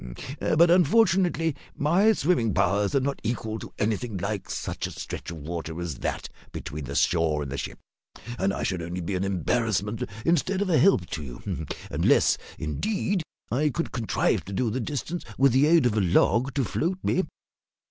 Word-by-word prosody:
But, 170 Hz, +2 st, +4 dB
unfortunately, 180 Hz, -4 st, +3 dB, 0.2 s
my 185 Hz, +9 st, +4 dB
swimming 140 Hz, -, +1 dB
powers 100 Hz, +2 st, +2 dB
are -, -, +5 dB
not 140 Hz, +1 st, -2 dB
equal 110 Hz, -1 st, -3 dB
to -, -, -9 dB
anything 110 Hz, 0 st, -1 dB
like 100 Hz, +2 st, -3 dB
such -, -, -3 dB
a -, -, -8 dB
stretch -, -, -6 dB
of 85 Hz, -, -6 dB
water 80 Hz, +1 st, -5 dB
as 85 Hz, -7 st, -4 dB
that -, -, -3 dB, 0.2 s
between 75 Hz, 0 st, -6 dB
the 70 Hz, +2 st, -6 dB
shore 80 Hz, -3 st, +2 dB
and 70 Hz, -, -6 dB
the 70 Hz, -, -3 dB
ship, -, -, -5 dB, 0.6 s
and 95 Hz, +1 st, +2 dB
I -, -, -3 dB
should 90 Hz, -2 st, -1 dB
only 85 Hz, +2 st, -4 dB
be 90 Hz, +4 st, -3 dB
an 90 Hz, 0 st, 0 dB
embarrassment 105 Hz, +2 st, 0 dB, 0.2 s
instead 175 Hz, +3 st, +2 dB
of 190 Hz, -, -2 dB
a 155 Hz, -, +5 dB
help 185 Hz, -, +4 dB
to 80 Hz, -, -3 dB
you, 80 Hz, +5 st, -5 dB, 0.2 s
unless, -, -, +3 dB, 0.2 s
indeed, 195 Hz, -, -1 dB, 0.3 s
I 145 Hz, +6 st, +2 dB
could 165 Hz, +4 st, -3 dB
contrive 115 Hz, -3 st, 0 dB
to 100 Hz, -, -7 dB
do 115 Hz, +3 st, 0 dB
the 130 Hz, -, -1 dB
distance 150 Hz, +7 st, -3 dB
with 135 Hz, 0 st, +5 dB
the 135 Hz, +5 st, +4 dB
aid 165 Hz, -3 st, +5 dB
of 115 Hz, -3 st, +2 dB
a 110 Hz, -, +2 dB
log 115 Hz, +8 st, +3 dB
to 140 Hz, -, +2 dB
float 175 Hz, +8 st, -1 dB
me." 185 Hz, -, +1 dB
115 Hz, 185 wpm, -26 LUFS, -, 0.6 s, are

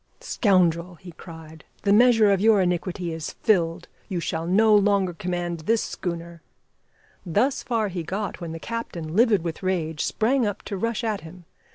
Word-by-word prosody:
"Scoundrel!" 180 Hz, -, +1 dB
he 175 Hz, +1 st, -12 dB
cried, 160 Hz, -2 st, -12 dB, 0.2 s
"the 200 Hz, -, +3 dB
measure 225 Hz, -2 st, +5 dB
of 195 Hz, -1 st, +2 dB
your 220 Hz, -1 st, +5 dB
iniquity 180 Hz, -1 st, -1 dB
is 160 Hz, -1 st, -5 dB
filled. 175 Hz, -4 st, +1 dB, 0.2 s
You 185 Hz, -3 st, -2 dB
shall 165 Hz, 0 st, -3 dB
no 215 Hz, +4 st, +4 dB
longer 200 Hz, -3 st, +3 dB
command 175 Hz, -2 st, -3 dB
this 220 Hz, +8 st, +1 dB
schooner 170 Hz, -2 st, -6 dB, 0.4 s
" -, -, -35 dB
Thus 245 Hz, -, +1 dB
far 225 Hz, -3 st, -1 dB
he 180 Hz, -2 st, -4 dB
got 190 Hz, +3 st, -4 dB
when 170 Hz, -1 st, -5 dB
the 165 Hz, -, -6 dB
captain, 175 Hz, -7 st, -5 dB
livid 220 Hz, -5 st, +4 dB
with 165 Hz, -2 st, -5 dB
rage, 165 Hz, -5 st, -1 dB
sprang 250 Hz, +4 st, +1 dB
up 205 Hz, -3 st, -3 dB
to 200 Hz, -, -5 dB
rush 230 Hz, +4 st, -2 dB
at 215 Hz, -3 st, -1 dB
him. 170 Hz, +2 st, -13 dB
185 Hz, 175 wpm, -24 LUFS, 170-215 Hz, 0.4 s, measure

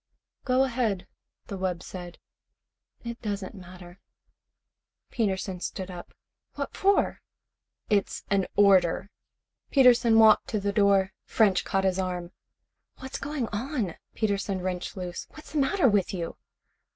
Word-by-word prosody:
"Go 255 Hz, 0 st, +3 dB
ahead," 235 Hz, -7 st, -1 dB, 0.4 s
the 195 Hz, -, -6 dB
wub 180 Hz, -2 st, -2 dB
said. 175 Hz, -2 st, -8 dB, 0.9 s
"It 235 Hz, 0 st, -6 dB
doesn't 205 Hz, -3 st, -4 dB
matter." 180 Hz, -1 st, -12 dB, 1.1 s
Peterson 190 Hz, -4 st, -1 dB
stood 190 Hz, +1 st, -5 dB
up. 175 Hz, -1 st, -10 dB, 0.4 s
"What 280 Hz, -1 st, -4 dB
for?" 400 Hz, +1 st, +2 dB, 0.7 s
"It's 205 Hz, -2 st, 0 dB
an 195 Hz, -2 st, +2 dB
order." 195 Hz, -1 st, +4 dB, 0.6 s
Peterson 245 Hz, -4 st, +5 dB
walked 220 Hz, -1 st, +6 dB
to 215 Hz, -, -1 dB
the 200 Hz, 0 st, -1 dB
door. 200 Hz, -2 st, +3 dB
French 200 Hz, -5 st, +2 dB
caught 195 Hz, 0 st, 0 dB
his 190 Hz, -1 st, +1 dB
arm. 180 Hz, -2 st, -3 dB, 0.7 s
"What's 265 Hz, +1 st, -6 dB
going 280 Hz, -4 st, -3 dB
on?" 225 Hz, -, -2 dB, 0.2 s
Peterson 200 Hz, -3 st, -1 dB
wrenched 180 Hz, +1 st, -4 dB
loose. 180 Hz, -2 st, -5 dB
"What's 310 Hz, -, -13 dB
the 310 Hz, -, 0 dB
matter 280 Hz, +2 st, +3 dB
with 200 Hz, -4 st, +2 dB
you?" 170 Hz, -2 st, -4 dB
200 Hz, 125 wpm, -27 LUFS, 185-235 Hz, 1.1 s, walked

